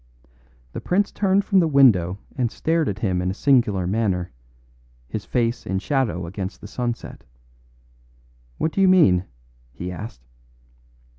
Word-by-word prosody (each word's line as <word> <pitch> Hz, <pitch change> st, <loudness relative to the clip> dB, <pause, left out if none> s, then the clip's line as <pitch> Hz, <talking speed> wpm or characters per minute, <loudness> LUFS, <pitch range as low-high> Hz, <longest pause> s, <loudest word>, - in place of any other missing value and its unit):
The -, -, -6 dB
prince 200 Hz, +3 st, +1 dB
turned 195 Hz, 0 st, +1 dB
from 195 Hz, -3 st, +3 dB
the 170 Hz, -, +3 dB
window 110 Hz, -, +4 dB, 0.2 s
and 125 Hz, -4 st, -1 dB
stared 160 Hz, -2 st, 0 dB
at 100 Hz, -, -4 dB
him 95 Hz, -4 st, -1 dB
in 90 Hz, -, -1 dB
a 95 Hz, -, -3 dB
singular 110 Hz, -9 st, +2 dB
manner, 95 Hz, -3 st, -1 dB, 0.8 s
his 105 Hz, -, -5 dB
face 115 Hz, +1 st, -1 dB
in 95 Hz, -, -2 dB
shadow 110 Hz, -, -1 dB
against 95 Hz, +2 st, -6 dB
the -, -, -10 dB
sunset. 120 Hz, +2 st, -5 dB, 1.3 s
"What 160 Hz, -, 0 dB
do 195 Hz, -, -1 dB
you 190 Hz, -, +5 dB
mean?" 100 Hz, -, +5 dB, 0.5 s
he 90 Hz, +9 st, -6 dB
asked. 90 Hz, -, -9 dB
110 Hz, 145 wpm, -22 LUFS, 90-145 Hz, 1.3 s, you